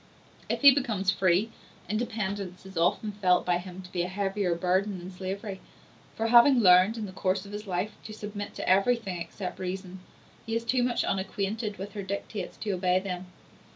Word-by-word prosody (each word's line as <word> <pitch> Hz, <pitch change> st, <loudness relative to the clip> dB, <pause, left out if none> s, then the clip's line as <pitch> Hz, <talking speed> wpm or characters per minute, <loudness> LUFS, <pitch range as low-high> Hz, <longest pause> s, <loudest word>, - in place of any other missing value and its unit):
If -, -, -1 dB
he 280 Hz, -1 st, +10 dB
becomes 220 Hz, -9 st, +1 dB
free, 185 Hz, +4 st, +2 dB, 0.4 s
independence 205 Hz, -5 st, -3 dB
is 190 Hz, 0 st, -11 dB
often 175 Hz, +5 st, +1 dB
felt 185 Hz, -3 st, +2 dB
by 175 Hz, -1 st, +2 dB
him 185 Hz, +1 st, -9 dB
to 180 Hz, -, -13 dB
be 175 Hz, -, -1 dB
a 175 Hz, -, -1 dB
heavier 195 Hz, -1 st, -1 dB
burden 185 Hz, +3 st, 0 dB
than 180 Hz, +1 st, -8 dB
slavery; 190 Hz, +2 st, -5 dB, 0.5 s
for 225 Hz, +1 st, -1 dB
having 240 Hz, +2 st, +7 dB
learned, 185 Hz, +3 st, +6 dB
in 220 Hz, -, -3 dB
the 190 Hz, -, -7 dB
course 185 Hz, +1 st, -1 dB
of 200 Hz, -, -10 dB
his 210 Hz, 0 st, -6 dB
life, 185 Hz, +3 st, -1 dB
to 220 Hz, -, -7 dB
submit 205 Hz, -1 st, -6 dB
to -, -, -5 dB
everything 195 Hz, -1 st, +2 dB
except 185 Hz, +2 st, -6 dB
reason, 185 Hz, 0 st, -5 dB, 0.4 s
he 225 Hz, -, -3 dB
is 230 Hz, 0 st, -1 dB
too 250 Hz, +2 st, +2 dB
much 245 Hz, 0 st, +1 dB
unacquainted 200 Hz, +2 st, -2 dB
with 195 Hz, +3 st, -6 dB
her 205 Hz, -, -4 dB
dictates 200 Hz, +1 st, -5 dB
to 210 Hz, -, -3 dB
obey 185 Hz, -1 st, +2 dB
them. 185 Hz, -1 st, -5 dB
195 Hz, 190 wpm, -28 LUFS, 185-215 Hz, 0.5 s, he